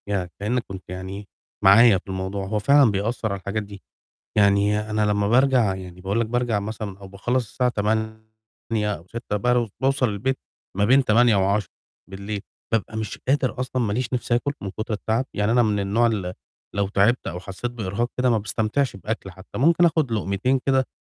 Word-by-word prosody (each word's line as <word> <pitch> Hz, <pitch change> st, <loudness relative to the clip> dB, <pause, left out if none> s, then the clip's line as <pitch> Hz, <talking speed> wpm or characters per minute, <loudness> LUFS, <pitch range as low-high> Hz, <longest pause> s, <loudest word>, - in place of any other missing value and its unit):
يعني 95 Hz, -3 st, -1 dB
كإنّك 115 Hz, +4 st, -1 dB
كنت 95 Hz, -2 st, -8 dB
يعني 95 Hz, +2 st, -6 dB, 0.4 s
معايا 100 Hz, +2 st, +7 dB
في 95 Hz, -, -12 dB
الموضوع، 95 Hz, +1 st, -3 dB
هو 105 Hz, +2 st, -1 dB
فعلًا 140 Hz, +1 st, +5 dB
بيأثّر 110 Hz, +2 st, -1 dB
على 100 Hz, -, -3 dB
الحاجات 100 Hz, +3 st, -3 dB
دي، 100 Hz, -1 st, -12 dB, 0.5 s
يعني 100 Hz, 0 st, +4 dB
أنا 105 Hz, 0 st, +1 dB
لمّا 105 Hz, -1 st, +1 dB
بارجع 125 Hz, -4 st, +4 dB
يعني 90 Hz, -1 st, -9 dB
باقول 100 Hz, +5 st, -1 dB
لك 115 Hz, -, 0 dB
بارجع 120 Hz, -2 st, 0 dB
مثلًا 105 Hz, -2 st, -6 dB
أو 100 Hz, -1 st, -11 dB
باخلّص 120 Hz, +6 st, -1 dB
الساعة 125 Hz, -1 st, +1 dB
20:00 110 Hz, 0 st, -1 dB, 0.7 s
أو 85 Hz, -3 st, -8 dB
18:00 115 Hz, -2 st, -4 dB
بر 120 Hz, +2 st, +1 dB
باوصل 135 Hz, -1 st, +2 dB
البيت 120 Hz, +6 st, -1 dB, 0.4 s
ما 100 Hz, -, +2 dB
بين 130 Hz, +5 st, +5 dB
20:00 115 Hz, -1 st, +4 dB
و22:00 100 Hz, +1 st, -3 dB, 0.3 s
بابقى 110 Hz, -1 st, -1 dB
مش 110 Hz, -1 st, -4 dB
قادر 135 Hz, -2 st, +1 dB
أصلًا 130 Hz, 0 st, -1 dB
ما 105 Hz, -3 st, 0 dB
ليش 120 Hz, +2 st, -2 dB
نِفْس 125 Hz, -1 st, -2 dB
آكُل 125 Hz, +4 st, +1 dB
من 100 Hz, -, -4 dB
كُتر 110 Hz, +3 st, -4 dB
التعب، 110 Hz, +4 st, -1 dB
يعني 105 Hz, +2 st, +1 dB
أنا 120 Hz, 0 st, +5 dB
من 105 Hz, -2 st, +1 dB
النوع 105 Hz, +4 st, +2 dB
اللي 95 Hz, -6 st, -1 dB, 0.4 s
لو 100 Hz, -1 st, 0 dB
تعبت 105 Hz, +5 st, +2 dB
أو 90 Hz, +1 st, -4 dB
حسّيت 95 Hz, +6 st, -5 dB
بإرهاق 115 Hz, 0 st, -2 dB
كده 125 Hz, 0 st, +3 dB
ما 115 Hz, -, +3 dB
باستمتعش 110 Hz, +5 st, -1 dB
بآكُل 100 Hz, +1 st, -4 dB
حتّى، 95 Hz, +1 st, -10 dB
ممكن 165 Hz, +6 st, +4 dB
آخُد 160 Hz, -7 st, +2 dB
لُقمتين 110 Hz, +5 st, 0 dB
كده 130 Hz, -1 st, +3 dB
110 Hz, 185 wpm, -23 LUFS, 100-120 Hz, 0.7 s, معايا